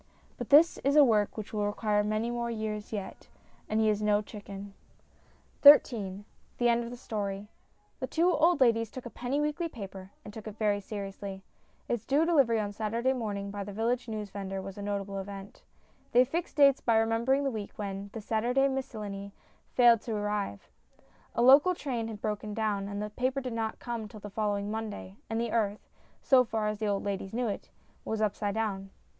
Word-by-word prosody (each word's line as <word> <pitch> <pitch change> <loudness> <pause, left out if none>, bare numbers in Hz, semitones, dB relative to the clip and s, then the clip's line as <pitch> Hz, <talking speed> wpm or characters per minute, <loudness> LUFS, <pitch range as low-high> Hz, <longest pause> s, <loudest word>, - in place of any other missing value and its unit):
But - - -6
this 310 +4 +6
is 280 +1 +1
a 300 - +9
work 215 -4 +2
which 215 0 -6
will 210 -1 0
require 210 0 +1
many 215 +3 -1
more 235 0 -2
years 215 -2 -4
yet, 205 -3 -6 0.4
and 215 - +1
he 220 - +3
is 210 -1 +1
no 210 0 +2
chicken. 200 -1 -9 0.9
XIII 205 -9 +6 0.3
THE 240 -1 +3
END 235 0 +2
OF 235 - -6
THE 245 - -8
STORY 205 -4 -4 0.5
THE - - -3
two 340 +3 +2
old 325 0 +3
ladies 230 -3 +4
took 255 +2 -9
a 240 - -7
penny 250 +4 -2
weekly 300 +3 -1
paper, 195 -6 -9 0.2
and 210 - -9
took 220 0 -9
it 215 0 -8
very 205 -2 +1
seriously. 195 -1 -6 0.4
Its 240 -3 -2
due 290 +4 +3
delivery 275 -9 +3
on 205 -1 -3
Saturday 230 +5 0
morning 205 -5 -3
by 205 0 -4
the 205 - -7
village 235 +4 -1
newsvendor 200 -3 -5
was 190 0 -7
a 205 - -7
notable 200 -1 -3
event. 195 0 -8 0.5
They 250 +1 +6
fixed 325 +7 -3
dates 275 -2 +5
by 230 -2 +3
remembering 230 +5 +2
the 275 - 0
week 215 -3 -6
when 200 -1 -5
The 225 - -5
Sunday 240 +6 +1
Miscellany 210 -7 -5 0.4
failed 240 -3 +6
to 225 -1 -4
arrive; 205 - -3 0.7
a 235 - +2
local 285 +8 +7
train 245 -8 -3
had 215 -2 -7
broken 210 -1 -3
down, 210 -3 -1
and 200 +1 -4
the 210 - -5
paper 255 +4 -1
did 255 -3 -5
not 225 -1 -2
come 235 -3 -5
till 215 +1 -11
the 205 0 -9
following 205 -1 -1
Monday, 210 - -5
and 225 0 -1
the 235 -1 -1
earth 210 -3 -1 0.4
so 260 -3 +6
far 220 -2 -2
as 210 -1 -4
the 215 - -1
old 200 -1 0
ladies 195 0 -4
knew 245 0 0
it 205 - -5 0.3
was 220 - -3
up 215 -2 +1
side 205 -1 -2
down. 200 -3 -2
215 Hz, 195 wpm, -30 LUFS, 205-240 Hz, 0.9 s, a